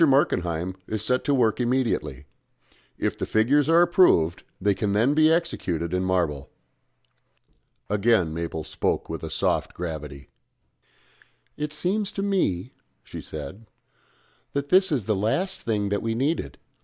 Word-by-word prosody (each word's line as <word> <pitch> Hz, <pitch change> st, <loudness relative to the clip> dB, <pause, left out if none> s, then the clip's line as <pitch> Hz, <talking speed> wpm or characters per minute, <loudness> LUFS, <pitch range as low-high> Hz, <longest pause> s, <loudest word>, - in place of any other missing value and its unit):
Markenheim 90 Hz, -, +1 dB
is 110 Hz, -2 st, -3 dB
to -, -, -1 dB
set 125 Hz, +2 st, +1 dB
to -, -, +1 dB
work 115 Hz, -3 st, +2 dB
immediately. 120 Hz, -, -1 dB, 0.7 s
If -, -, -1 dB
the -, -, -4 dB
figures 135 Hz, +8 st, +3 dB
are 170 Hz, +1 st, +6 dB
approved 170 Hz, -, +3 dB, 0.2 s
they 100 Hz, +1 st, +2 dB
can 100 Hz, 0 st, -1 dB
then 115 Hz, +7 st, +3 dB
be 155 Hz, +1 st, +5 dB
executed 90 Hz, -, -1 dB
in 90 Hz, 0 st, 0 dB
marble." 85 Hz, -7 st, -1 dB, 1.4 s
Again 105 Hz, -5 st, +2 dB
Mabel 80 Hz, -1 st, -4 dB
spoke -, -, -2 dB
with -, -, -5 dB
a -, -, -4 dB
soft -, -, -1 dB
gravity. 75 Hz, -5 st, -6 dB, 1.3 s
"It 150 Hz, 0 st, -4 dB
seems 190 Hz, +7 st, -1 dB
to 195 Hz, -, -3 dB
me," 130 Hz, -, 0 dB, 0.3 s
she -, -, -8 dB
said, 105 Hz, +10 st, -8 dB, 0.9 s
"that 140 Hz, 0 st, -2 dB
this 190 Hz, 0 st, +5 dB
is 130 Hz, -9 st, 0 dB
the 110 Hz, 0 st, +1 dB
last 175 Hz, -, -1 dB
thing 105 Hz, -3 st, -1 dB
that 100 Hz, 0 st, -1 dB
we 115 Hz, 0 st, -2 dB
needed. 140 Hz, +7 st, -1 dB
110 Hz, 145 wpm, -25 LUFS, 90-150 Hz, 1.4 s, are